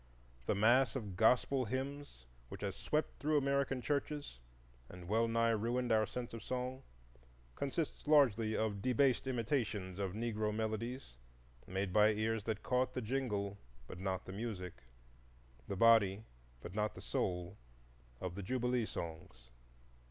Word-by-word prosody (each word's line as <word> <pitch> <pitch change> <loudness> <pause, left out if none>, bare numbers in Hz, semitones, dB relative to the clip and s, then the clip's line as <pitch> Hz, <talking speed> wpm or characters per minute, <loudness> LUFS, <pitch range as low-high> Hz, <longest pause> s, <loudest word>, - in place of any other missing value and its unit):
The - - +2
mass 120 +3 +4
of 105 -8 -4
"gospel" 125 +5 +3
hymns 130 - -5 0.2
which - - -8
has - - -2
swept 155 +1 -1
through 150 +1 +2
American 140 -2 +1
churches 145 - -2 0.5
and 90 -1 -10
well 115 +4 +2
nigh 115 0 +2
ruined 120 +3 0
our 110 -1 +4
sense 125 -2 -5
of 115 - -6
song 130 +1 -3 0.7
consists 140 - -3
largely 115 -8 +4
of 105 -3 -1
debased 130 +2 +2
imitations 110 -7 -1
of 95 -2 -2
Negro 110 -1 -1
melodies 110 - -3 0.5
made 95 0 -2
by 105 +1 +6
ears 110 0 -1
that 110 -2 -2
caught 125 0 +1
the 125 - -1
jingle 105 -5 -2 0.3
but 85 - -9
not 95 -1 -2
the 95 - -7
music, 95 -4 -4 0.9
the 100 - -3
body 110 -2 +5 0.4
but 85 - -8
not 105 +1 -1
the - - -9
soul, 90 +2 -2 0.6
of 90 -2 -4
the 100 - -5
Jubilee 125 +2 0
songs. 80 -7 -7
110 Hz, 145 wpm, -36 LUFS, 100-125 Hz, 0.9 s, by